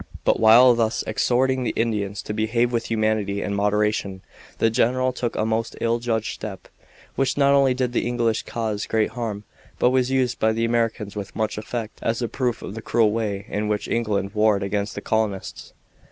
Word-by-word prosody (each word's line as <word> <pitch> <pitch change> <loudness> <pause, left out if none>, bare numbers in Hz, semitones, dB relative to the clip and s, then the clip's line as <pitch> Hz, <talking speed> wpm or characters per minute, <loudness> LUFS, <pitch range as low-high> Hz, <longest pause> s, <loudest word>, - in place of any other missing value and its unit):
But - - +2
while 120 +3 +7
thus 115 -1 0
exhorting 130 +1 +1
the - - -2
Indians 105 -3 -1
to 105 - -5
behave 115 +3 +1
with 115 -1 -1
humanity 110 -3 0
and 100 - -2
moderation, 105 -1 0 0.3
the 115 - +2
general 130 +3 +1
took 120 -2 -3
a 110 - 0
most 110 +1 -1
ill 115 0 +1
judged 115 -2 -1
step, 100 -3 -8 0.5
which 135 0 0
not 140 -1 +4
only 135 -2 +4
did 125 -1 -1
the 120 - 0
English 120 -2 0
cause 110 -3 -3
great 110 -1 +1
harm, 110 -4 -4 0.3
but 125 - +3
was 130 -1 +2
used 130 -2 0
by 110 0 +2
the 115 +1 0
Americans 115 -3 -1
with 100 -1 -6
much 110 -1 -1
effect 110 +1 -5
as 115 0 -1
a 120 - -1
proof 125 -1 -2
of - - -6
the 115 - -6
cruel 110 -1 +2
way 105 -3 -2
in 105 +1 -2
which 105 -1 -1
England 105 -4 -1
warred 105 -2 +2
against 100 +1 -2
the - - -5
colonists. 110 -3 -2
110 Hz, 195 wpm, -23 LUFS, 105-120 Hz, 0.5 s, while